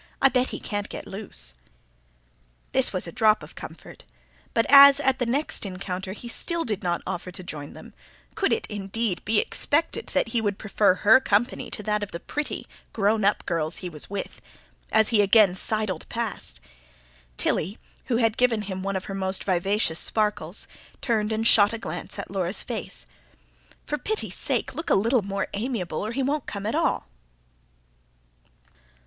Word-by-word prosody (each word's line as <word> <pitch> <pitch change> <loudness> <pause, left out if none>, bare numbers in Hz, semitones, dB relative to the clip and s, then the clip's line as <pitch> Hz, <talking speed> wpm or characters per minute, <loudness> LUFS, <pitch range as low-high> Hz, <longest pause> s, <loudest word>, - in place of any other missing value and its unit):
I 270 - +6
bet 255 0 +2
he - - -5
can't 205 -1 -3
get - - -7
loose." 125 - -3 1.2
This - - +3
was - - -1
a - - -6
drop 220 -3 +3
of - - -11
comfort. - - -10 0.5
But 230 - +2
as, 280 0 +9
at 265 -2 +2
the 245 - 0
next 280 +6 -1
encounter, 190 -1 -4
he 240 - -9
still 335 +7 0
did 210 -4 -2
not 175 -1 -1
offer 180 -1 -4
to 180 +1 -7
join 150 -4 -7
them - - -12 0.4
could 395 -3 0
it, 455 - +1
indeed, 205 -1 -3
be 215 0 +3
expected 330 +10 -1
that 280 -5 0
he 230 0 0
would 205 -2 -1
prefer 205 -2 +2
her 215 +7 +6
company 230 -2 0
to 210 - -6
that 210 0 0
of 205 - -5
the 170 - -4
pretty, 295 - -4 0.3
grown 215 0 +2
up 205 +1 +2
girls 165 -1 -2
he 180 - -5
was 150 -3 -6
with? 200 0 -5 0.5
as 220 -1 +4
he 220 -3 +4
again 200 -1 +5
sidled 200 -2 -2
past, 220 - -3 0.8
Tilly, 195 +8 0 0.3
who 235 - +1
had 225 -2 +2
given 235 -4 +2
him 190 -2 -5
one 195 +1 -2
of 190 - -3
her 195 - -6
most 190 0 -1
vivacious 185 -2 +1
sparkles, 210 -5 -1 0.3
turned 220 -3 0
and 220 +1 -1
shot 210 -1 +7
a - - -2
glance 225 - -6
at 200 - -6
Laura's 190 0 -1
face. - - -5 0.8
"For 295 - -2
pity's 435 0 -1
sake, - - 0
look 325 +1 -5
a - - +5
little 230 +5 +3
more 195 0 -2
amiable, 200 -7 -2
or 215 - -3
he 270 - -1
won't 285 +1 -1
come 200 -1 -5
at 220 - -1
all." - - +1
210 Hz, 180 wpm, -25 LUFS, 190-235 Hz, 1.2 s, as